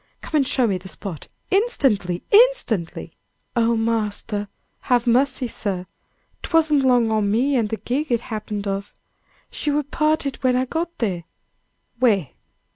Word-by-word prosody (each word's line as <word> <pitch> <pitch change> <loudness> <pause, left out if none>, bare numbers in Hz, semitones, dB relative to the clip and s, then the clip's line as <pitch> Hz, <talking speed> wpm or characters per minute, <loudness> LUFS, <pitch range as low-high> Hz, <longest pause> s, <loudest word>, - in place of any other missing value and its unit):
Come 310 - -1
and 275 - +1
show 255 - +2
me 195 -5 0
the 190 +1 -11
spot! 180 -4 -8 0.2
instantly! 265 - +1
instantly!" 415 - +3 0.4
"Oh, 235 0 +3
marster, 215 -2 -1 0.3
have 245 -2 +1
mercy, 250 +1 +2
sir! 190 -5 -4 0.6
'Twasn't 315 -4 +2
along 245 -3 +3
o' 215 -1 +2
me 230 +8 +1
an' 230 -4 +2
the 220 - -3
gig 275 +6 -2
it 235 -1 +2
happened 215 -2 -5
of! 200 0 -4 0.6
She 300 - -3
wur 295 +1 +1
'parted 305 -1 0
when 255 -1 +2
I 255 +1 +1
got 335 +5 -3
there!" 185 -7 -2 0.8
"Where? 205 - +3
235 Hz, 145 wpm, -22 LUFS, 205-280 Hz, 0.8 s, instantly